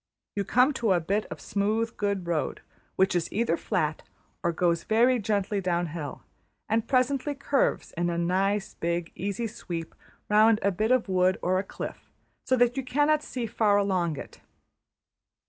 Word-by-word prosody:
You 200 Hz, -, 0 dB
come 250 Hz, +8 st, +4 dB
to 220 Hz, -5 st, +3 dB
a 175 Hz, -, +3 dB
bit 200 Hz, +6 st, -1 dB
of -, -, -8 dB
smooth, 220 Hz, +3 st, -1 dB
good 200 Hz, -3 st, -1 dB
road, 170 Hz, -2 st, -2 dB, 0.3 s
which 190 Hz, -1 st, +2 dB
is 175 Hz, -, -1 dB
either 220 Hz, -5 st, +1 dB
flat 155 Hz, -2 st, -1 dB, 0.4 s
or 170 Hz, -, +1 dB
goes 170 Hz, 0 st, +1 dB
very 240 Hz, +3 st, +3 dB
gently 205 Hz, -1 st, 0 dB
down 175 Hz, -1 st, 0 dB
hill; 150 Hz, -4 st, -6 dB, 0.4 s
and 225 Hz, +1 st, 0 dB
presently 275 Hz, +2 st, +1 dB
curves 275 Hz, 0 st, 0 dB
in 175 Hz, +1 st, -1 dB
a 170 Hz, -, -2 dB
nice, 190 Hz, +4 st, 0 dB
big, 170 Hz, 0 st, -2 dB
easy 200 Hz, +4 st, -3 dB
sweep 175 Hz, -7 st, -6 dB, 0.3 s
round 215 Hz, +1 st, +5 dB
a 200 Hz, -, +3 dB
bit 215 Hz, +4 st, -1 dB
of 255 Hz, -3 st, +3 dB
wood 185 Hz, 0 st, +2 dB
or 185 Hz, +1 st, +2 dB
a -, -, -2 dB
cliff, -, -, -8 dB, 0.4 s
so 260 Hz, -, +3 dB
that 245 Hz, 0 st, +3 dB
you 270 Hz, -, -1 dB
cannot 295 Hz, +4 st, +2 dB
see 250 Hz, -5 st, -4 dB
far 210 Hz, -2 st, +2 dB
along 185 Hz, -6 st, 0 dB
it. -, -, -9 dB
200 Hz, 170 wpm, -27 LUFS, 175-230 Hz, 0.4 s, round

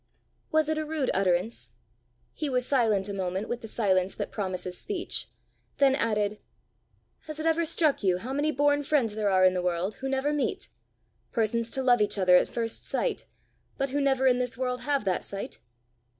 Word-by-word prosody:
Was 315 Hz, -1 st, +3 dB
it 315 Hz, 0 st, 0 dB
a -, -, -1 dB
rude 305 Hz, -3 st, -1 dB
utterance? 180 Hz, -, 0 dB, 0.6 s
He 300 Hz, -2 st, -3 dB
was 250 Hz, -1 st, +1 dB
silent 220 Hz, -8 st, +2 dB
a 200 Hz, -, -4 dB
moment 190 Hz, +1 st, -2 dB
with 240 Hz, -, -4 dB
the 225 Hz, -, -7 dB
silence 190 Hz, -4 st, +1 dB
that -, -, -4 dB
promises 185 Hz, -3 st, -3 dB
speech, 370 Hz, -, -3 dB, 0.5 s
then 275 Hz, -1 st, +5 dB
added 210 Hz, -5 st, 0 dB, 0.9 s
"Has 310 Hz, 0 st, -5 dB
it 310 Hz, -, -3 dB
ever 325 Hz, +1 st, +2 dB
struck 315 Hz, -2 st, +2 dB
you 185 Hz, -2 st, +3 dB
how 245 Hz, +8 st, -5 dB
many 295 Hz, +2 st, +1 dB
born 290 Hz, +1 st, +2 dB
friends 275 Hz, -7 st, +1 dB
there 210 Hz, -1 st, 0 dB
are 185 Hz, -1 st, +4 dB
in 185 Hz, -, +5 dB
the 180 Hz, -, -1 dB
world 180 Hz, +3 st, -1 dB
who 270 Hz, -, -2 dB
never 270 Hz, +2 st, 0 dB
meet 295 Hz, -, -2 dB, 0.6 s
persons 230 Hz, 0 st, 0 dB
to 265 Hz, -, -3 dB
love 245 Hz, -3 st, +4 dB
each 210 Hz, -, +1 dB
other 185 Hz, -2 st, +5 dB
at -, -, +4 dB
first 230 Hz, -1 st, -2 dB
sight, -, -, -2 dB, 0.5 s
but 275 Hz, -1 st, -1 dB
who 285 Hz, +1 st, 0 dB
never 265 Hz, -1 st, +2 dB
in 250 Hz, -1 st, +4 dB
this 250 Hz, -2 st, -2 dB
world 250 Hz, -1 st, -2 dB
have 280 Hz, -5 st, 0 dB
that 185 Hz, -2 st, 0 dB
sight?" 200 Hz, 0 st, -5 dB
240 Hz, 195 wpm, -27 LUFS, 195-285 Hz, 0.9 s, then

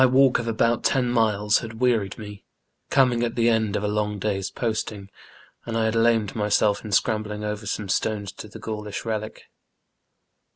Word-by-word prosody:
walk 130 Hz, 0 st, +4 dB
of 115 Hz, -, -4 dB
about 115 Hz, +1 st, +1 dB
ten 130 Hz, -3 st, +2 dB
miles 105 Hz, -3 st, +2 dB
bad 110 Hz, -1 st, -8 dB
wearied 115 Hz, -6 st, +1 dB
me, 105 Hz, -1 st, -9 dB, 0.5 s
coming 125 Hz, -3 st, +3 dB
at 115 Hz, -1 st, -2 dB
tbe 115 Hz, -1 st, +2 dB
end 110 Hz, -3 st, +2 dB
of 105 Hz, -, -1 dB
a -, -, +1 dB
long 105 Hz, 0 st, -1 dB
day's 95 Hz, -1 st, -2 dB
posting, 110 Hz, -4 st, -3 dB, 0.5 s
and 115 Hz, -1 st, -3 dB
I 110 Hz, -1 st, +2 dB
bad -, -, -4 dB
lamed 115 Hz, -3 st, +2 dB
myself 105 Hz, -1 st, +2 dB
in 105 Hz, -, -7 dB
scrambling 105 Hz, 0 st, 0 dB
over 105 Hz, 0 st, -4 dB
some 105 Hz, 0 st, -3 dB
stones 105 Hz, +1 st, -1 dB
to 110 Hz, -, -10 dB
tbe -, -, -11 dB
Gaulisb 105 Hz, -1 st, -5 dB
relic. 110 Hz, -1 st, -4 dB
110 Hz, 175 wpm, -24 LUFS, 105-115 Hz, 0.5 s, walk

